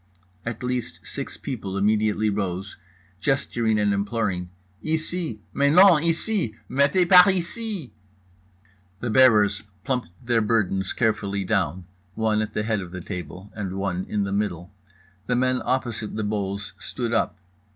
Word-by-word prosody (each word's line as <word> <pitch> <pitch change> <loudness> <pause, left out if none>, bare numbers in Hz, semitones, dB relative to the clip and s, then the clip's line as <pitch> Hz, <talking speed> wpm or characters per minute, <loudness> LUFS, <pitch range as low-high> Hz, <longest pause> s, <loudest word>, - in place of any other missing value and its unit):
At 115 +1 -4
least 125 -1 -3
six - - -5
people 100 -7 -5
immediately 105 +1 +2
rose, 95 -1 -3 0.4
gesturing 120 -3 +1
and 105 -1 +2
imploring: 100 -3 -1 0.3
"Ici"—"Mais 155 - -1
non, 180 -2 +7
ici"—"Mettez 165 - +1
par 180 +1 +9
ici"— 190 - -4 1.1
The 120 0 -2
bearers 105 -6 +5 0.2
plumped 125 -5 -1 0.2
their 120 -1 +2
burdens 100 -4 +1
carefully 100 -4 0
down, 90 0 -1 0.3
one 110 -1 +1
at 110 0 -4
the 105 - 0
head 110 -2 0
of 90 - -7
the 90 +1 -7
table 90 +2 -7
and 100 -3 -4
one 95 -2 -2
in 105 -1 0
the 100 - -3
middle. 100 -2 -2 0.5
The 125 - +1
men 130 +1 +1
opposite 120 -4 -2
the 110 - -2
bowls 100 -2 -3
stood 120 -2 -3
up. 115 - +1
110 Hz, 135 wpm, -24 LUFS, 100-130 Hz, 1.1 s, par